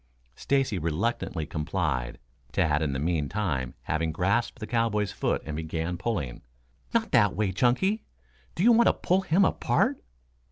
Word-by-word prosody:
Stacy 135 -8 0
reluctantly 85 0 -1
complied, 75 -6 -2 0.3
Tad 75 -1 +1
in 75 -3 0
the - - -2
meantime 75 - -1
having 80 0 -1
grasped 100 +11 0
the 115 - -6
cowboy's 110 -3 0
foot - - -1
and 75 - -4
began 80 +2 -3
pulling. 85 - -3 0.5
"Not - - 0
that - - +4
way, 105 -1 0
Chunky. 130 - +2 0.5
Do 175 - 0
you 240 - +7
want 235 0 +5
to - - +5
pull 185 +2 +1
him 190 +2 +3
apart?" - - +1
90 Hz, 150 wpm, -27 LUFS, 80-120 Hz, 0.5 s, you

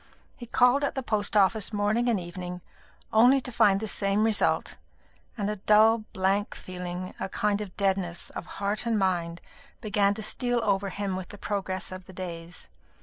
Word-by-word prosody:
He 240 - -10
called 250 +4 +4
at 285 - -1
the 265 - -2
post 215 -2 0
office 205 +2 +3
morning 215 +3 +1
and 220 -4 +2
evening, 180 0 -7 0.5
only 245 +5 +6
to 250 - -7
find 200 -3 +4
the 220 - -4
same 200 +1 +1
result; 220 -2 +1 0.6
and 205 -2 -1
a 210 0 -2
dull 215 +3 +4
blank 195 +1 0
feeling, 180 0 -6
a - - -3
kind 210 +1 0
of 195 -4 -8
deadness 190 -3 -1
of 175 - -7
heart 205 +3 -1
and 230 -2 +2
mind, 175 -3 -1 0.4
began 205 -2 +1
to 220 - -4
steal 245 +3 +1
over 200 -1 +1
him 195 0 -3
with 185 -1 -5
the 205 - -9
progress 190 -2 -3
of 185 0 -8
the 190 - -13
days. 170 -2 -7
200 Hz, 180 wpm, -27 LUFS, 185-215 Hz, 0.6 s, only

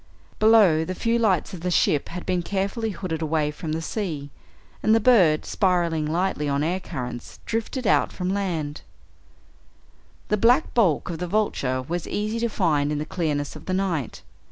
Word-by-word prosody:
Below, 210 -8 +5
the 185 +3 -4
few 230 +3 +1
lights 195 -7 +1
of 180 - -7
the 180 - -1
ship 150 -4 +2
had 180 +1 -6
been 180 -1 0
carefully 200 +5 -2
hooded 170 -4 -4
away 155 -1 0
from 155 +1 -6
the 160 +1 -3
sea, 155 -8 -4 0.5
and 220 - +4
the - - +4
bird, 190 -11 +4
spiraling 170 -5 +1
lightly 165 -2 -1
on 140 +1 0
air 175 +4 0
currents, 125 -7 -7
drifted 230 +3 -3
out - - +3
from 180 +1 -2
land. 165 -7 -2 1.5
The 210 - +2
black 245 +8 +3
bulk 185 -8 +2
of 165 - -5
the 180 - -3
Vulture 140 -10 0
was 170 +5 -4
easy 215 +2 -2
to 235 0 0
find 150 -8 +1
in 150 - -1
the 150 - -3
clearness 150 -4 -2
of - - -12
the 185 - 0
night. 175 - -2
175 Hz, 180 wpm, -24 LUFS, 155-205 Hz, 1.5 s, Below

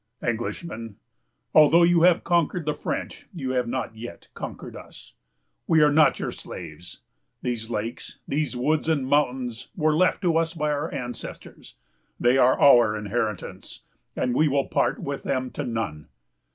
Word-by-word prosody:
"'Englishman, 115 - -4 0.6
although 155 +3 +7
you 170 -1 +4
have 175 0 +5
conquered 170 -1 +1
the 150 - 0
French, - - -5
you 135 -6 -3
have 125 -2 0
not 120 -2 -3
yet 115 +2 -10
conquered - - -7
us. - - -13 0.5
We 160 -2 +5
are 150 - +5
not 155 +1 +4
your - - -3
slaves. 80 +3 -10 0.4
These 120 -2 -3
lakes, 115 +1 -5
these 145 -1 -1
woods 155 +5 0
and 145 -5 +1
mountains, 130 -4 0
were 155 -3 +2
left 185 +4 +2
to 170 -2 +3
us 165 +1 -2
by 150 -2 0
our 145 +3 -2
ancestors. 125 -4 -8 0.4
They 120 +2 +4
are 130 0 +4
our 120 -6 +6
inheritance; 105 -1 -4 0.3
and 125 - 0
we 155 +5 +3
will 140 -1 +1
part - - +1
with 140 0 -5
them 130 -1 -2
to 145 - -4
none. 110 - -4
130 Hz, 155 wpm, -25 LUFS, 120-155 Hz, 0.6 s, although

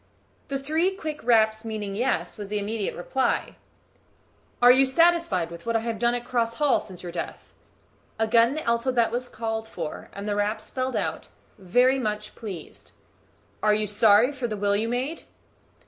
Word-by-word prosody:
The 275 - -2
three 320 +7 0
quick 310 -5 -6
raps 220 -2 +3
meaning 215 -3 -4
"Yes" 250 +4 -1
was 205 -2 -7
the 210 +1 -2
immediate 210 0 -2
reply. 260 +9 -1 1.0
"Are 245 0 +8
you 260 +2 +6
satisfied 270 - +2
with 170 +5 -10
what 230 - 0
I 225 - +2
have 225 -2 -3
done 240 +1 +2
at 240 0 -4
Cross 230 -2 0
Hall 295 -3 +3
since 185 -3 -11
your 175 - -5
death?" - - -6 0.6
Again 230 +3 +3
the 310 - -4
alphabet 235 0 +2
was 245 +1 -3
called 225 -1 -4
for, 165 -7 -6
and 200 +1 -7
the 205 - 0
raps 210 +1 -1
spelled 255 -1 -3
out, - - -2 0.3
"Very 250 +8 +3
much 210 -3 -3
pleased." 195 -8 -9 0.7
"Are 210 -1 +4
you 215 0 0
sorry 210 +4 +4
for 260 -4 -3
the 215 -2 -4
will 200 0 +1
you 220 +3 0
made?" 260 +7 -2
230 Hz, 175 wpm, -25 LUFS, 210-255 Hz, 1.0 s, Are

